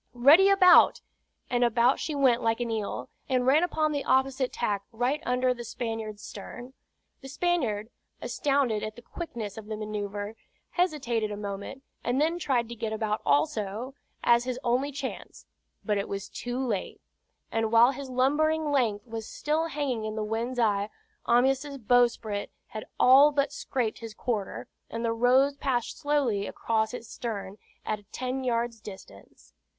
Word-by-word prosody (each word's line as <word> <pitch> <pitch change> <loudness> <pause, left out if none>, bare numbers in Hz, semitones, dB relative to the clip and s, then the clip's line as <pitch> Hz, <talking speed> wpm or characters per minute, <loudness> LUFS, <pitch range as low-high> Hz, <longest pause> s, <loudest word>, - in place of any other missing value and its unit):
"Ready 300 +11 +7
about!" 375 -2 +7 0.5
and 245 0 +1
about 240 +2 +3
she 310 - -3
went 255 -4 +3
like 225 0 +1
an 240 -1 -2
eel, 215 -2 -3 0.2
and 255 -1 +1
ran 280 +5 +5
upon 315 -3 +1
the 285 -2 -2
opposite 265 0 +1
tack 205 -4 -1
right 250 +6 0
under 250 0 +2
the 240 -1 -8
Spaniard's 225 -3 -5
stern. 245 +5 -9 0.5
The 270 - -9
Spaniard, 255 -10 -1 0.3
astounded 275 -7 0
at 215 0 -5
the 240 - -13
quickness 225 - -6
of 215 - -12
the 215 -1 -4
manoeuvre, 205 -1 -4 0.4
hesitated 260 - 0
a 205 - -4
moment, 200 +6 -6 0.2
and 245 +3 0
then 325 +4 +1
tried 255 -7 0
to 235 - -6
get 220 -1 -3
about 220 -1 -1
also, 200 - 0 0.3
as 235 0 +4
his 255 -1 -2
only 255 +4 +1
chance; 280 -1 -7 0.4
but 210 -2 +1
it 200 - -4
was 195 -1 -5
too 245 0 -5
late, 235 -8 -2 0.5
and 225 -1 0
while 230 +2 +6
his 275 0 -7
lumbering 295 +4 +1
length 225 -7 +1
was 225 -2 -6
still 315 +2 -1
hanging 275 -8 -2
in 215 0 -4
the 215 - -2
wind's 230 +4 -3
eye, 205 -3 +1 0.4
Amyas' 265 +4 +2
bowsprit 235 -3 +1 0.2
had 215 - -7
all 275 +4 +7
but 285 0 0
scraped 250 -5 -2
his 225 -2 -8
quarter, 215 -6 -3 0.2
and 230 +1 -3
the 230 - +1
Rose 260 +4 +3
passed 250 -5 -2
slowly 275 -9 0
across 220 -1 0
his 240 -2 -7
stern 205 -4 -5 0.3
at 205 -1 -4
ten 255 +1 -3
yards' 235 -2 -1
distance. 200 -3 -13
240 Hz, 160 wpm, -28 LUFS, 215-270 Hz, 0.5 s, Ready